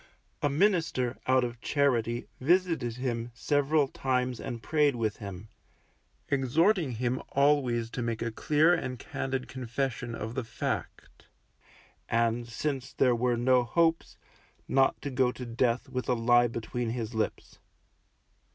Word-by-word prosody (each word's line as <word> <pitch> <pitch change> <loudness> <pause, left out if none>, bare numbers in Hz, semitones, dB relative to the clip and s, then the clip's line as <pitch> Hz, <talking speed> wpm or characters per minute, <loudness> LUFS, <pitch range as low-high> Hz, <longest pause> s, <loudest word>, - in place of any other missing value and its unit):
A 145 - +2
minister, 155 - +1
out 130 0 +4
of 120 -1 -5
charity, 120 -5 +1
visited 165 -5 +1
him 120 -2 -3
several 145 +2 +2
times 125 -2 -1
and 115 -1 -6
prayed 150 -4 +2
with 110 -3 -1
him, 100 0 -8 0.8
exhorting 145 - +2
him 125 +3 -1
always 130 -5 +2
to - - -4
make 115 -1 -2
a 115 - -2
dear 155 +8 +3
and 125 -7 -2
candid 130 +1 -4
confession 125 -1 -3
of 110 0 -5
the 130 - -2
fact, 110 - -5 0.8
and, 115 +1 +1
since 135 +2 -3
there 125 -2 +3
were 120 0 +1
no 125 +1 +4
hopes, 165 +6 +1 0.5
not 135 0 +3
to 140 - -3
go 125 -1 +2
to 125 - -8
death 120 +1 0
with 125 0 -4
a 125 - +3
lie 120 +1 +4
between 115 +1 -3
his 115 -1 -4
lips. 110 -1 -3
125 Hz, 140 wpm, -29 LUFS, 115-140 Hz, 0.8 s, out